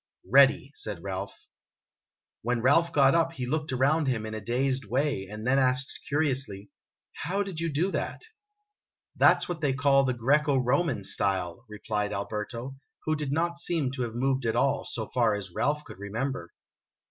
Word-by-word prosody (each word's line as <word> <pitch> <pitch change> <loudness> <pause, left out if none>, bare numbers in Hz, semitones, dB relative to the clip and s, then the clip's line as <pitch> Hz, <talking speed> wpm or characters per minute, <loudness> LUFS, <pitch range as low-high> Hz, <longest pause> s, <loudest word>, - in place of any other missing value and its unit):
"Ready," 135 +4 +5
said 105 -8 -4
Ralph. 100 0 -6 1.0
When 120 0 -1
Ralph 165 +6 +4
got 135 -2 +5
up 165 0 +2
he 130 -5 -4
looked 150 +3 -2
around 140 +4 +2
him 115 -4 -1
in 110 - -5
a 110 - -5
dazed 130 +4 -1
way, 125 -3 -1
and 105 +2 -7
then 135 +2 +3
asked 130 0 +1
curiously, 130 -9 -1 0.2
" - - -66
How 195 +6 0
did 190 -5 -6
you 165 0 -1
do 170 +7 0
that? - - -3 0.5
' 415 - -61
"That - - +6
's - - -5
what 175 -3 -4
they 145 -3 +2
call 135 0 +4
the 130 -2 0
Greco 140 +4 +2
Roman 130 - +1
style," 95 +1 -1
replied 105 0 -3
Al 100 0 -3
berto, 115 +5 -5 0.3
who 155 - +1
did 150 -3 -3
not 170 +3 0
seem 165 -6 0
to 130 -1 -5
have 115 -2 -3
moved 130 0 0
at 110 - 0
all, - - +1
so - - -3
far - - +1
as 95 -3 -6
Ralph 150 +7 0
could - - -12
remember. 100 -2 -4
130 Hz, 185 wpm, -28 LUFS, 110-145 Hz, 1.0 s, That